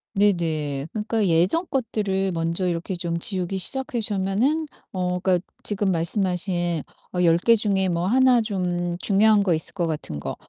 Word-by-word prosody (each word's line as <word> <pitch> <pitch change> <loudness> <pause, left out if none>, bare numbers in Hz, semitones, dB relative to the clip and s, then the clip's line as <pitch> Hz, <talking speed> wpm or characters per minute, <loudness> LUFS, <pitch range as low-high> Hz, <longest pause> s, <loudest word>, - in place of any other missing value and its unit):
네네 160 -8 0
그러니까 215 -1 -1
예전 180 - +2
것들을 205 -7 -1
먼저 165 +2 -1
이렇게 175 +2 -3
좀 170 -1 -3
지우기 190 +1 +1
시작하시면은 235 - +1 0.3
어 180 -1 -2
그러니까 185 0 +2 0.2
지금 200 -2 0
말씀하신 175 -1 0 0.3
어 180 - -1
10 165 -1 +4
개 230 +7 +3
중에 195 -3 +1
뭐 170 +1 -1
1 255 +1 +4
좀 175 -4 -2
중요한 205 +2 +3
거 180 -4 +1
있을 160 - -3
것 175 -3 -1
같은 150 - -4
거 - - -5
190 Hz, 305 characters per minute, -23 LUFS, 170-210 Hz, 0.3 s, 10